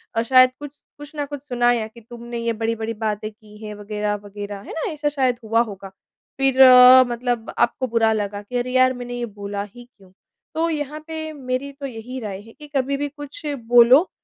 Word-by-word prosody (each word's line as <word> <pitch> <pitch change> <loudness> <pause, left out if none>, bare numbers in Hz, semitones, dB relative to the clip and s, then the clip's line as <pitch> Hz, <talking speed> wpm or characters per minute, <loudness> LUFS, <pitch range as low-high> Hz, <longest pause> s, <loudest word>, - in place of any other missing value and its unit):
अ, 225 - +2
शायद 255 +1 +6
कुछ 290 -1 -8 0.3
कुछ 290 +1 -11
न 290 -1 -2
कुछ 285 -1 -7
सुनाया 245 -2 +2
य - - -8
कि 235 - -14
तुमने 235 +1 -9
ये 230 0 -1
बड़ी-बड़ी 225 0 -2
बातें 215 -1 -3
की 210 -1 -18
हैं। 210 - -6
वगैरह-वगैरह, 205 -1 -5
है - - -11
ना? 320 - -3
ऐसा 295 -1 -1
शायद 260 -4 0
हुआ 225 +1 +2
होगा। 200 -4 -6 0.5
फिर 270 -1 +2
अ, 255 0 +9
मतलब 240 -1 -2
आपको 260 +2 +1
बुरा 225 -1 +2
लगा 205 -1 -3
कि 225 +5 -5
अरे! 245 +1 -2
यार, 255 0 +4
मैंने 245 -1 -7
ये 240 - -2
बोला 200 -2 -6
ही 240 +4 -13
क्यों? 190 -2 -20 0.4
तो 330 +1 +1
यहाँ 300 -1 -4
पे 315 -1 -5
मेरी 260 0 -4
तो 275 0 -8
यही 250 0 -7
राय 200 -4 -6
है 225 +2 -16
कि 300 - -11
कभी 275 +1 0
भी 290 +1 -2
कुछ 290 +2 -10 0.2
बोलो, 245 +8 +6
240 Hz, 205 wpm, -22 LUFS, 215-270 Hz, 0.5 s, अ